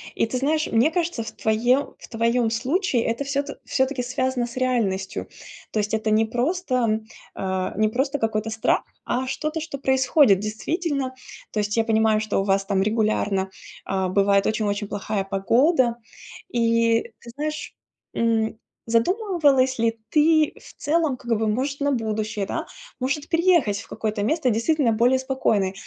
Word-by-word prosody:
И - - +2
ты 250 +3 -3
знаешь, 305 +4 +1
мне 235 +8 +3
кажется, 335 -8 -1
в - - -7
твоем 240 +5 +1
в - - -12
твоем 230 0 +1
случае- 260 - 0
это 230 +4 -1
всё 280 0 -1
т 285 - -7
всё-таки 265 -1 0
связано 250 0 -1
с 240 +1 -9
реальностью. 210 -7 -1 0.5
То 215 - 0
есть 210 +1 -2
это 220 0 0
не 220 +1 +4
просто, 245 -3 0 0.4
э, 190 -1 -2
не 215 0 +3
просто 275 +5 -1
какой-то 220 -1 -1
страх, 220 0 +1 0.2
а 255 +1 -1
что-то, 305 +4 -2
что 300 -3 -5
происходит 265 - +4
действительно. 275 - -2 0.4
То 215 - -2
есть 210 +2 -2
я 225 - +4
понимаю, 220 -1 +3
что 215 -2 0
у - - -1
вас 195 0 +1
там 195 -1 +1
регулярно, 210 -3 0 0.4
а, 190 -1 -1
бывает 200 +1 +3
очень-очень 205 -1 -1
плохая 205 0 -2
погода. 235 - +2 0.6
И 230 0 +3 0.2
ты 235 - -12
знаешь, 305 +1 -4 0.4
м, 225 -1 +1 0.3
задумывалась 280 - +2
ли 225 0 +1 0.2
ты 310 0 +4
в - - -14
целом, 305 -4 +1
как 240 -1 -7
бы, 220 - 0
может, 270 +6 -1
на 285 - +2
будущее, 215 -4 -2
да, - - -3 0.4
может, 280 +4 -1
переехать 335 - +3
в - - -14
какое-то 215 -2 -3
место, 300 +3 +1
действительно 235 +2 +2
более 245 +4 +3
спокойное? 225 -8 0
235 Hz, 160 wpm, -23 LUFS, 215-275 Hz, 0.6 s, не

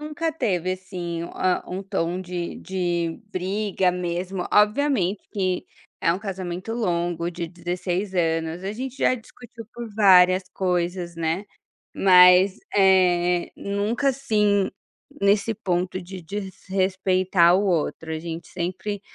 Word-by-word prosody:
Nunca 310 +2 -3
teve, 185 - -1
assim, 180 -3 -5
ah 185 -1 0
um 185 +2 -4
tom 185 -2 -2
de 180 -2 -5
de 175 -3 -2
briga 190 0 0
mesmo, 180 +1 -3
obviamente 210 -3 +2
que 185 -3 -1 0.4
é 165 - +3
um 180 - -3
casamento 185 0 -5
longo 175 -6 -1
de 170 -1 -5
16 180 +3 -3
anos, 165 0 -1
a 195 - -2
gente 260 +3 -6
já 255 - +3
discutiu 235 -1 -12
por 240 -1 -7
várias 185 -3 +6
coisas, 180 -1 -1
né, 165 +4 -1 0.5
mas, 180 0 +6 0.2
eh, 180 -2 +3
nunca 205 +7 -1
assim 210 -7 +1 0.5
nesse 200 +3 +3
ponto 180 -1 -1
de 185 +1 -9
desrespeitar 185 -1 +1
o 200 - 0
outro, 160 -3 -1
a 155 - -3
gente 165 0 -6
sempre 185 +3 -4
185 Hz, 125 wpm, -24 LUFS, 175-200 Hz, 0.5 s, várias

